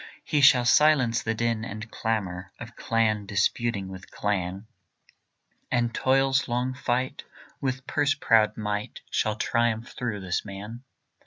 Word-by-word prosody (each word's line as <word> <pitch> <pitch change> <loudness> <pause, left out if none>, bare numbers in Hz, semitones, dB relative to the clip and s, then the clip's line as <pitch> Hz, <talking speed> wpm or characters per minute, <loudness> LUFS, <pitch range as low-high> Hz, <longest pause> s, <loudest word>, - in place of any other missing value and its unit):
He 150 - +1
shall 130 -3 +6
silence 130 -4 +4
the 115 0 -2
din 115 -1 -1
and 110 0 -7
clamour 95 -5 -3
Of 115 +2 -9
clan 110 -3 0
disputing 100 +1 0
with 95 0 -10
clan, 95 -1 -2 1.0
And 120 -1 0
toil's 135 +1 +2
long 125 +1 -1
fight 130 0 -2 0.4
with 130 -1 -2
purse 145 0 +1
proud 110 -6 +3
might 105 -1 -3
Shall 110 -1 0
triumph 115 +1 0
through 115 -5 -3
this 90 -2 -2
man. 105 +4 -8
115 Hz, 135 wpm, -26 LUFS, 105-125 Hz, 1.0 s, shall